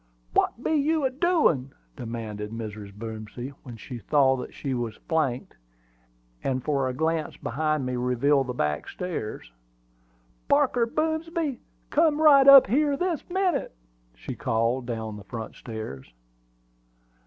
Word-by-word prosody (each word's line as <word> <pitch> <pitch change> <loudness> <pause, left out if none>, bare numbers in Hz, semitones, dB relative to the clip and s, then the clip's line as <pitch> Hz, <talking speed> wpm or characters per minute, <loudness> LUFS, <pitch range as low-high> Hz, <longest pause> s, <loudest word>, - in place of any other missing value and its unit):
"What 240 - +1
be - - 0
you 305 0 +2
a 260 - +1
doin'?" 260 - +2 0.2
demanded 110 -4 -5
Mrs. 105 -2 -7
Boomsby, 110 +3 -7
when 120 -4 -10
she 120 +3 -8
saw 135 +4 +3
that 125 - -6
she 135 -2 -4
was 120 -3 -3
flanked; 140 -6 -1 1.1
for 140 -3 0
a - - -3
glance 160 +1 -1
behind 155 -2 -1
me 125 0 -2
revealed 125 +3 +2
the 125 - -3
back 75 -6 -1
stairs. 160 - -5 1.0
"Parker 235 - +3
Boomsby, 315 -1 -1 0.3
come 310 -1 +3
right 285 -3 +7
up 275 -1 +11
here, 280 +5 +2
this 355 -2 -1
minute!" 360 - 0 0.4
she - - -7
called 115 +3 0
down 110 -3 -4
the 100 - -10
front 110 +2 -7
stairs. 110 - -8
135 Hz, 130 wpm, -26 LUFS, -, 1.1 s, up